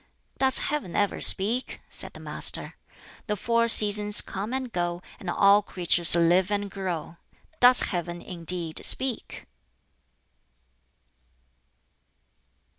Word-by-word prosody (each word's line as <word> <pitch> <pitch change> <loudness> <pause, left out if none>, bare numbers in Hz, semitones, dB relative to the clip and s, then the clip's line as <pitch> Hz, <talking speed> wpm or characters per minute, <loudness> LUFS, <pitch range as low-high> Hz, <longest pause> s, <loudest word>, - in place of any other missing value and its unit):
"Does 265 -1 +4
Heaven 290 - -4
ever 205 -1 -2
speak?" 225 +7 +1
said - - -8
the - - -13
Master. - - -2 0.5
"The 210 - -3
four 230 +3 -2
seasons 210 -1 +5
come 200 +4 -8
and 260 -2 -6
go, 175 0 -5 0.2
and 185 - -9
all 200 +3 +2
creatures 175 -3 +3
live 175 +3 +1
and 205 -1 -4
grow. 175 -4 -7 0.4
Does 250 0 +6
Heaven 175 -2 -6
indeed 170 -2 -5
speak?" 260 -3 0
195 Hz, 110 wpm, -24 LUFS, 175-225 Hz, 0.5 s, Does